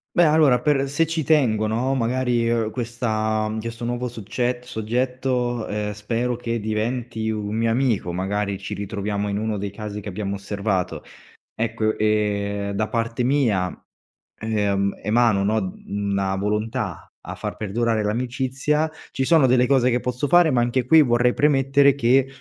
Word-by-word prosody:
Beh, 175 - +6
allora 150 -5 +4
per 140 -2 +1
se 160 +4 +1
ci 165 0 -1
tengo, 125 -8 +2
no, 125 +5 0
magari, 120 -1 0
uhm, 115 -2 +1
questa 110 -2 -1
mhmm, 110 +1 -3
questo 115 +1 -6
nuovo 120 +1 -2
succett 120 +2 -3
soggetto, 125 +1 -1
ehm, 105 0 -3
spero 115 +4 -2
che 115 -1 -3
diventi 110 +1 -2
un 105 -1 -3
mio 115 0 +1
amico, 115 -7 0
magari 100 +2 -2
ci 100 +1 -6
ritroviamo 100 0 -3
in 100 - -2
uno 110 0 -2
dei 100 0 -4
casi 105 0 -6
che 105 - -6
abbiamo 100 +1 -3
osservato. 100 -1 -2 0.5
Ecco 110 -1 -1
e 100 -1 0
da 110 +2 -1
parte 115 +1 -1
mia, 120 -9 +1 0.7
ehm, 100 -3 0
emano, 110 -1 +3
no, 110 +2 +2 0.2
mhmm, 100 - -4
una 95 -1 0
volontà 105 0 -3
a - - -8
far - - -5
perdurare 110 +2 0
l'amicizia, 130 +7 -1 0.2
ci 135 - -1
sono 160 -1 +5
delle 125 0 +4
cose 130 -2 +3
che 120 0 +1
posso 125 +3 -2
fare, 175 -1 +5
ma 125 -2 +3
anche 120 +1 0
qui 160 +5 +7
vorrei 120 -2 +3
premettere 140 -1 +3
che, 130 0 +3
115 Hz, 160 wpm, -23 LUFS, 105-125 Hz, 0.7 s, qui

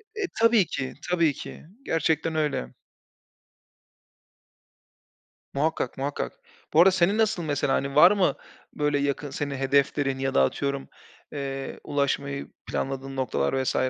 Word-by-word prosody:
E - - -6
eee, 390 - 0
tabii 230 -4 +5
ki, 130 -4 -4 0.2
tabii 165 -4 +3
ki. - - -9 0.2
Gerçekten 160 0 0
öyle. 145 - -1 2.8
Muhakkak, 150 -3 0
muhakkak. 140 +2 -3 0.4
Bu 155 - +5
arada 190 - +7
senin 190 +3 +2
nasıl 220 -5 +1
mesela? 145 -3 0
Hani, 140 +1 -1
var 175 +5 +8
mı, 190 -9 +2 0.4
böyle, 150 -1 +1
yakın, 140 +1 -1
senin 140 0 -3
hedeflerin 135 0 +1
ya 135 0 -1
da 65 - +5
atıyorum, 140 - -2 0.4
eee, 135 -1 -5
ulaşmayı 140 -1 -1 0.2
planladığın 135 0 -3
noktalar 130 0 0
vs. - - -1
140 Hz, 130 wpm, -26 LUFS, 135-160 Hz, 2.8 s, var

